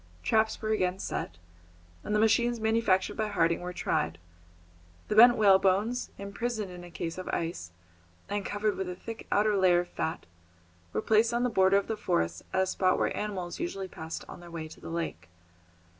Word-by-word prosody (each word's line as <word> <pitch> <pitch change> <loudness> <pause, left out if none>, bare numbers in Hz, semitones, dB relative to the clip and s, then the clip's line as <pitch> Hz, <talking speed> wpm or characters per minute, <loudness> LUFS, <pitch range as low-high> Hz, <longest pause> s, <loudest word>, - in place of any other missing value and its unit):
Traps 220 0 +2
were 215 - -3
again 185 -3 +1
set, 85 - -4 0.7
and 210 - -1
the - - +3
machines 235 +2 +3
manufactured 220 -3 +2
by 215 - -1
Harding 170 -5 +1
were 180 0 -4
tried. 85 - -1 0.9
The 210 - 0
bent 240 +2 +8
whalebones, 200 +3 +3
imprisoned 210 0 -4
in 180 0 -9
a 175 - -10
case 170 +1 -5
of 185 - -7
ice, 165 - -3 0.6
and 205 0 -2
covered 205 +1 -1
with 190 -1 -3
a 180 - -5
thick 225 +4 -9
outer 210 0 +3
layer 180 -2 +4
of 175 - -9
fat, 160 - -3 0.7
were - - -2
placed 225 +2 +3
on 240 - +1
the 250 - +2
border 190 -1 +4
of 200 - 0
the 220 - -2
forest 85 - -1
at 190 - +2
a - - 0
spot 185 0 +1
where - - 0
animals 190 -4 -4
usually 195 - -3
passed 160 -2 -7
on - - -10
their 175 0 -12
way 165 -2 -6
to - - -13
the - - -8
lake. 160 - -4
195 Hz, 190 wpm, -29 LUFS, 175-220 Hz, 0.9 s, bent